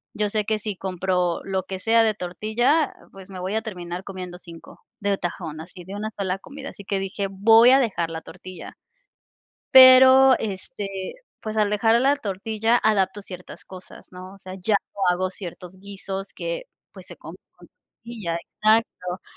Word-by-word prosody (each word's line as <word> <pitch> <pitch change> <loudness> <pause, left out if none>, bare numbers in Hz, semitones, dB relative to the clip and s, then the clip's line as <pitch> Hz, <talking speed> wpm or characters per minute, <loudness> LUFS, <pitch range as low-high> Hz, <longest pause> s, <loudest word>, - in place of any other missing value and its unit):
Yo 210 0 0
sé 215 +1 0
que 215 -1 0
si 210 -1 -5
compro 180 -2 -1
lo 190 -1 -2
que 190 0 -6
sea 225 +3 +4
de 220 -1 +2
tortilla, 220 - 0 0.2
pues, 195 0 -13
me 185 -2 -8
voy 185 +3 -3
a 220 - 0
terminar 180 -3 -6
comiendo 185 -2 -8
5 170 -2 -14 0.2
de 200 -1 0
tajón, 160 -3 -5
así 180 +2 -12
de 195 +2 -8
una 215 +1 -4
sola 190 -1 -1
comida. 280 +4 -9
Así 200 - -13
que 195 -1 -1
dije: 195 +1 -3
"Voy 225 +5 +6
a 270 - +6
dejar 190 -10 -1
la 160 0 -6
tortilla". 185 0 -11 1.0
Pero, 260 0 +9
este, 200 +1 -5 0.5
pues, 215 0 -5
al 210 -1 +2
dejar 225 +2 +3
la 280 +2 +3
tortilla, 220 +1 0
adapto 205 -2 +1
ciertas 180 -2 -10
cosas, 185 -1 -13
¿no? 185 +1 -10
O - - -16
sea, 185 -1 -9
ya 215 +2 +1 0.2
no 200 - -9
hago 185 +1 -2
ciertos 180 -1 -10
guisos 195 0 -7
que, - - -4 0.3
pues, - - -13
se - - -11
comen - - -11
con - - -19
tortilla 220 -8 -8
exacto. 195 -1 -1
195 Hz, 175 wpm, -23 LUFS, 185-220 Hz, 1.0 s, Pero